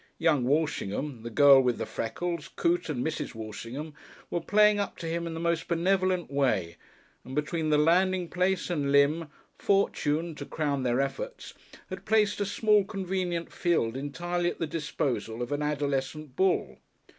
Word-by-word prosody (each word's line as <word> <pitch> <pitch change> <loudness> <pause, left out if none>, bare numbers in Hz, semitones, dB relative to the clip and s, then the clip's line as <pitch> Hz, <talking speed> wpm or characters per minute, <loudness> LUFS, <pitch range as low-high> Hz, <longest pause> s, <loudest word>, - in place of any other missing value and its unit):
Young 155 -6 +2
Walshingham, 140 -3 -1
the 115 - -6
girl 140 +2 +7
with 125 -2 +1
the - - -3
freckles, 170 +8 -4
Coote 170 0 +1
and 125 -5 -2
Mrs. 160 - -3
Walshingham, 115 +7 -7 0.4
were 175 - -1
playing 210 +3 +4
up 200 - -3
to 170 - -7
him 170 +1 -2
in 165 - -5
the - - -4
most 170 -1 0
benevolent 185 0 +1
way, 105 -12 0 0.5
and 130 - -8
between 155 +2 -1
the 150 - +4
landing 180 +3 +3
place 180 +1 0
and 145 -5 0
Lympne, 145 +3 +3 0.3
Fortune, 170 -5 +1
to 145 -1 -7
crown 145 -3 -1
their 125 0 +1
efforts, - - -4 0.4
had - - -6
placed 210 -1 +2
a 200 - 0
small, 210 0 +3
convenient 185 -3 -3
field 160 -10 +1
entirely 175 +6 -2
at - - -6
the 165 - -1
disposal 150 -7 -3
of 120 - -6
an 145 +1 -1
adolescent 145 -1 -2
bull. 190 +2 +1
160 Hz, 165 wpm, -28 LUFS, 140-175 Hz, 0.5 s, girl